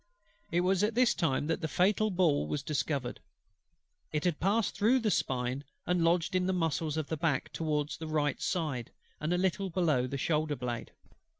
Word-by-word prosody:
It 175 +2 +2
was 185 +1 +2
at 215 +1 +1
this 250 -1 +4
time 145 -6 0
that 160 +1 -1
the 160 - -1
fatal 205 +6 +2
ball 175 -7 +2
was 145 -2 -2
discovered: 140 -3 -2 0.9
it 150 - -1
had 175 -4 0
passed 205 +4 +1
through 220 +6 +4
the 225 -4 +1
spine, 125 -1 -1 0.2
and 180 -1 +1
lodged 170 +1 +2
in 180 0 +2
the 190 - +1
muscles 160 -3 0
of 155 - -1
the 160 - -3
back, 145 -3 0
towards 150 -2 -1
the 160 - -5
right 150 -2 0
side, 150 - -1 0.3
and 155 +2 -2
a 180 - +2
little 190 +1 0
below 155 -8 +1
the 140 - -4
shoulder 155 +1 0
blade. 120 -3 -4
160 Hz, 190 wpm, -31 LUFS, 145-185 Hz, 0.9 s, this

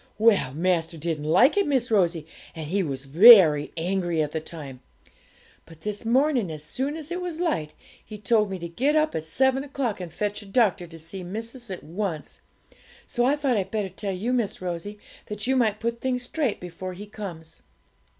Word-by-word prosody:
Well, 215 - +4
master 170 -1 0
didn't 155 -1 -3
like 190 - +4
it, 400 - +3
Miss 255 -5 0
Rosie, 170 -6 +2 0.3
and 160 -2 -5
he 195 +5 0
was 140 -5 -4
very 160 - +8
angry 175 -1 -1
at 150 - -4
the 160 - -2
time; 145 -5 -9 0.9
but 165 -1 -15
this 210 +3 -4
morning, 250 - +2
as 155 -1 -7
soon 275 - -3
as 315 +1 -9
it 355 +1 -3
was 350 -3 -5
light, 165 - -1 0.3
he 215 - -9
told 210 0 +2
me 190 - -4
to 170 -1 -6
get 265 - 0
up 310 0 +2
at 160 - -3
seven 265 - +1
o'clock 265 -8 -3
and 175 -2 -7
fetch 205 +4 -3
a 205 - -13
doctor 195 -5 +2
to 165 0 -12
see 165 +4 -8
missis 225 +6 -7
at 185 - -6
once. 170 -2 -5 0.6
So 240 - 0
I 275 +3 +3
thought 275 -5 0
I'd 190 -1 -2
better 210 -2 -2
tell 195 +2 -4
you, 205 +7 -2
Miss 235 -5 -1
Rosie, 180 +3 -5 0.3
that 210 0 -3
you 265 +1 +2
might 220 -5 +2
put 235 +1 -3
things 250 -1 -1
straight 265 -2 -1
before 180 +1 -7
he 200 +3 -9
comes.' 180 -7 -9
200 Hz, 200 wpm, -25 LUFS, 170-245 Hz, 0.9 s, very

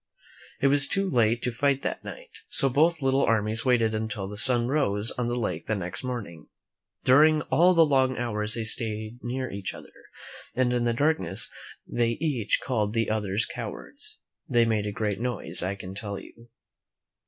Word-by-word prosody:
It - - +1
was 140 +1 +4
too 195 0 0
late 120 -7 +2
to 125 - 0
fight 140 +3 0
that - - -3
night, - - -10
so 135 - +2
both 155 +3 +2
little 135 +1 +2
armies 110 0 +1
waited 115 -3 +3
until 110 -3 -3
the 105 - -7
sun 120 +2 +5
rose 115 -7 0
on 125 -1 -3
the 120 - -1
lake 95 -9 -3
the 110 - 0
next 90 +2 -5
morning. 110 -11 -6 0.6
During 150 +3 +5
all 175 +7 +5
the 165 -1 +6
long 130 -3 +2
hours 105 -3 0
they 115 - -2
stayed 110 0 -2
near 130 +1 -4
each 100 -1 -5
other, - - -13 0.6
and 125 -1 +1
in 120 -1 0
the 120 - +1
darkness 115 - +2 0.3
they 115 -1 0
each 140 -9 0
called 110 -5 -1
the 115 -1 0
others 105 0 0
cowards. - - -7 0.3
They 120 -1 +4
made 110 -2 0
a - - -2
great 105 -1 -2
noise, 120 -9 +1
I 95 +3 -2
can 95 -1 -8
tell 100 0 -4
you. 115 +3 -14
120 Hz, 180 wpm, -26 LUFS, 105-130 Hz, 0.6 s, the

